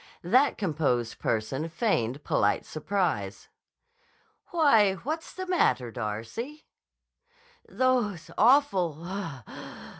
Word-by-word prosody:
That 255 +11 +3
composed 145 - -1
person 130 +9 -1
feigned 145 - -1
polite - - +1
surprise. 155 - -2 1.0
"Why, 225 - +4
what's 310 - -5
the 375 - -6
matter, 240 - +1
Darcy?" 120 - -5 1.0
"Those 210 -10 0
awful—pouf! 185 - +1
180 Hz, 80 wpm, -28 LUFS, -, 1.0 s, Why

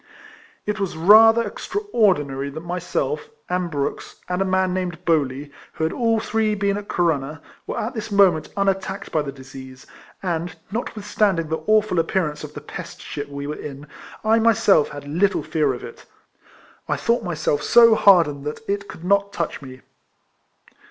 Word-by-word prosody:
It 210 +1 -2
was 190 -5 -3
rather 225 +6 +7
extraordinary 195 - 0
that 160 +4 -8
myself, 180 - -3 0.2
and 180 -1 -1
Brooks, 145 -3 -4
and 180 +1 -1
a - - +2
man 185 -1 +1
named 180 -2 -4
Bowley, 145 -3 0 0.2
who - - -4
had 160 - 0
all 230 -2 +1
three 220 -1 0
been 200 0 0
at 205 0 -6
Corunna, 155 -3 -1 0.3
were - - -3
at 225 +4 -3
this 220 -2 -6
moment 190 -6 +4
unattackcd 195 -1 -1
by 155 - +1
the 145 -2 -5
disease, 130 -1 -12 0.4
and, 175 -1 -2 0.2
not 230 +3 -4
withstanding 200 -5 0
the 160 - -2
awful 215 -4 +3
appearance 160 -3 -1
of 150 -1 -9
the 145 - -7
pest 150 - -9
ship 145 0 -6
we 140 0 -6
were 150 - -3
in, 145 -1 -8 0.4
I 225 +1 +4
myself 220 -8 +4
had 145 -1 -9
little 180 +7 +1
fear 155 -3 +1
of 125 - -6
it, - - -11 0.8
I - - +2
thought 235 +1 0
myself 155 -4 -1
so 230 +7 +6
hardened 170 -10 +4
that 150 +9 -6
it 200 0 -2
could 160 - -11
not 200 +1 +2
touch 170 -6 -3
me. 130 -1 -11
180 Hz, 170 wpm, -22 LUFS, 150-205 Hz, 0.8 s, rather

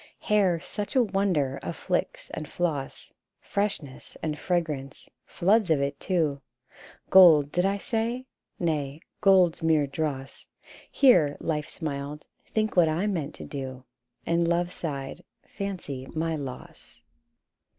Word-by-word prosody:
Hair, 195 -5 +2
such 205 +4 -5
a 255 - +6
wonder 190 - 0
of - - -5
flix - - -2
and 155 - -6
floss, 155 -6 -3 0.3
Freshness 195 -10 -4
and 150 -2 -2
fragrance 155 -7 -2
— - - -58
floods 200 +2 +2
of 155 -3 +3
it, 140 0 -2
too! 155 -7 0 0.7
Gold, 160 -6 +8
did 180 +1 +1
I 200 +1 0
say? 235 +4 -2 0.3
Nay, 150 -3 -2 0.2
gold's 190 -5 +4
mere 160 -2 +3
dross: 140 -1 -4 0.4
Here, 170 - +5
Life 150 -2 -2
smiled, 145 -1 -5 0.2
M - - -31
Think 215 0 0
what 170 -3 +5
I 165 +6 0
meant 165 -8 -2
to - - -9
do! 130 -2 -6 0.2
" 120 - -45
And 170 0 +2
Love 175 +1 +1
sighed, 140 -6 -5 0.2
M - - -32
Fancy 175 -10 -5
my 160 0 0
loss 135 -4 -9
160 Hz, 140 wpm, -27 LUFS, 140-190 Hz, 0.7 s, Gold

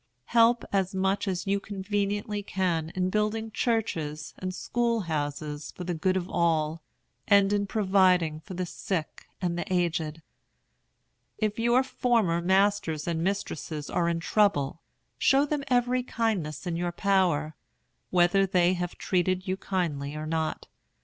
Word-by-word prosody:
Help 235 +1 +5
as 190 -1 +1
much 195 +2 0
as 185 0 -2
you 200 0 +1
conveniently 205 +1 -2
can 175 -5 -1
in 185 0 0
building 215 +2 0
churches 165 -11 -1
and 185 0 -3
school 235 +4 0
houses 150 -2 -3
for 180 - -7
the 175 0 -2
good 185 +3 +1
of 180 -1 -3
all, 160 -2 +1 0.5
and 200 0 +5
in 200 -1 +1
providing 185 -6 +3
for 185 +4 -9
the 185 +1 -2
sick 170 -2 -4 0.2
and 175 -1 0
the 175 - -5
aged. 165 -3 -1 1.1
If 215 0 -1
your 240 +3 +4
former 225 -10 +1
masters 190 -4 +2
and 165 -1 -1
mistresses 160 -5 -3
are 170 -1 +1
in 170 -1 0
trouble, 165 -6 +1 0.4
show 275 +2 +4
them 295 -1 -2
every 250 -1 +2
kindness 200 - -2
in 175 -2 -2
your 175 +1 -1
power, 175 -5 +1 0.6
whether 185 +2 +4
they 180 -1 +3
have 175 -1 -4
treated 185 0 0
you 185 - 0
kindly 155 -8 -2
or 155 0 -4
not. 160 0 -2
185 Hz, 145 wpm, -27 LUFS, 165-205 Hz, 1.1 s, Help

